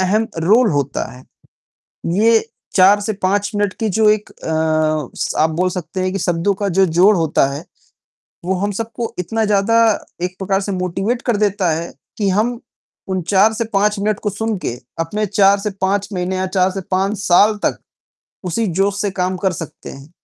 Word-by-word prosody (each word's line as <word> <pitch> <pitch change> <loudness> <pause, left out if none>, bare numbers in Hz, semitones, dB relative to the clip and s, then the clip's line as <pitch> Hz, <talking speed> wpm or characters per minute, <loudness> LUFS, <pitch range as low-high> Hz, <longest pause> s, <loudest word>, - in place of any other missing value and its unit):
अहम 210 +4 +2
रोल 215 +7 +4
होता 140 -2 -1
है। 125 - -13 0.9
ये 225 +4 +4 0.3
4 195 +2 +6
से 215 +1 -2
5 200 +1 0
मिनट 205 -2 0
की 220 -1 0
जो 215 +2 +3
एक 210 0 +1
अ, - - -23 0.8
स - - -2
आप 155 - +4
बोल 180 +3 0
सकते 180 0 -5
हैं 185 0 0
कि 195 - -2
शब्दों 175 +3 +1
का 200 +1 -3
जो 190 +1 +3
जोड़ 185 +5 +4
होता 160 -5 +2
है, 145 - -6 0.8
वो 190 - +1
हम 205 +1 -1
सबको 230 +2 -4
इतना 225 +5 -1
ज़्यादा 210 +2 +2 0.5
एक 180 0 -3
प्रकार 195 0 0
से 200 - -3
मोटिवेट 195 +6 -2
कर 240 -5 0
देता 200 -3 +1
है, 165 +2 -3 0.2
कि 205 -2 +1
हम 230 +5 0 0.5
उन 190 -1 -1
4 195 +5 +3
से 225 - -1
5 210 +1 +2
मिनट 210 0 0
को 210 - -2
सुन 220 +1 -2
के, 125 - -3 0.3
अपने 205 +6 -1
4 200 0 +4
से 210 - -2
5 200 +1 +1
महीने 180 0 -2
या 185 0 -1
4 185 0 +2
से 195 +1 -5
5 195 +3 0
साल 205 +2 +4
तक - - 0 0.7
उसी 185 +6 -1
जोश 195 +2 0
से 205 - 0
काम 185 0 -1
कर 185 +1 0
सकते 165 -3 -8
हैं। 140 +2 -12
195 Hz, 195 wpm, -18 LUFS, 180-210 Hz, 0.9 s, 4